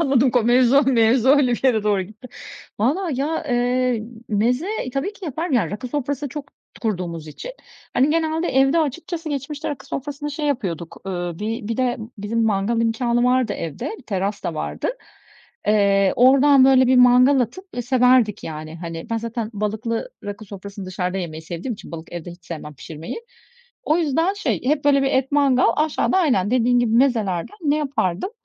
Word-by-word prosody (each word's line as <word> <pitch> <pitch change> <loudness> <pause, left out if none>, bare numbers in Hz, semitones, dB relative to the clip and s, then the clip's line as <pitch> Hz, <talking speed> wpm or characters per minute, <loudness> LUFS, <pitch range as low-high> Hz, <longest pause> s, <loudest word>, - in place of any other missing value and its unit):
Anladım 270 -4 +3
ko 245 -1 +2
mevzu, 245 +3 +4
o 280 - +6
mevzu 240 -1 +3
öyle 275 -3 +5
bir 240 - -3
yere 225 -5 +3
doğru 205 -2 +1
gitti. 215 +6 -12 0.5
Vallahi 280 - 0
ya, 320 +3 -1
eee, 245 -1 +1 0.3
meze 240 - +1 0.3
tabii 275 +10 -1
ki 415 - -11
yaparım, 320 +1 -2
rakı 240 0 -1
sofrası 285 +1 -3
çok 285 +1 -7 0.3
kurduğumuz 175 -7 -3
için. 470 - -8 0.4
Hani 270 +4 +3
genelde 320 +1 0
evde 270 +4 +3
açıkçası 330 +2 -3
geçmişte 290 +1 -4
rakı 290 - -6
sofrasını 290 +2 -5
şey 295 +1 -3
yapıyorduk, 180 - -3
uuu, 175 -3 -4
bir 220 +1 -4
bir 230 - -2
de 250 -2 0 0.2
bizim 225 +3 -1
mangal 220 +2 +1
imkânı 235 +1 +1
vardı 250 -3 +2
evde, 165 - -5
bir - - -15
teras 200 -1 -3
da - - -2
vardı. - - -3 0.8
Eee, 200 -2 +3
oradan 270 +2 +6
böyle 260 -1 +5
bir 255 +1 +4
mangal 250 +2 +6
atıp, 250 - -3
eee, 245 - -2
severdik 250 -4 +3
yani. 155 0 -7
Hani 165 +1 -7
ben 230 - 0
zaten 230 -1 -4
balıklı 220 - -3
rakı 205 +1 -6
sofrasını 200 -1 -9
dışarıda 185 0 -3
yemeyi 160 -3 -5
sevdiğim 175 +9 -5
için 205 - -12
balık 165 0 -8
evde 175 0 -6
hiç 175 0 -14
sevmem 150 -2 -7
pişirmeyi. 155 +3 -8 0.7
O 315 +3 +2
yüzden 330 +5 +1
şey, 410 - -2
hep 285 +2 +1
böyle 280 -1 +4
bir 270 - +1
et 265 +1 0
mangal, 275 -3 +4
aşağıda 310 +4 +1
aynen 250 - +2
dediğin 245 0 +3
gibi 235 -2 0
mezelerden 230 - +1
ne 295 0 +2
yapardım? 275 - -1
245 Hz, 175 wpm, -21 LUFS, 205-280 Hz, 0.8 s, o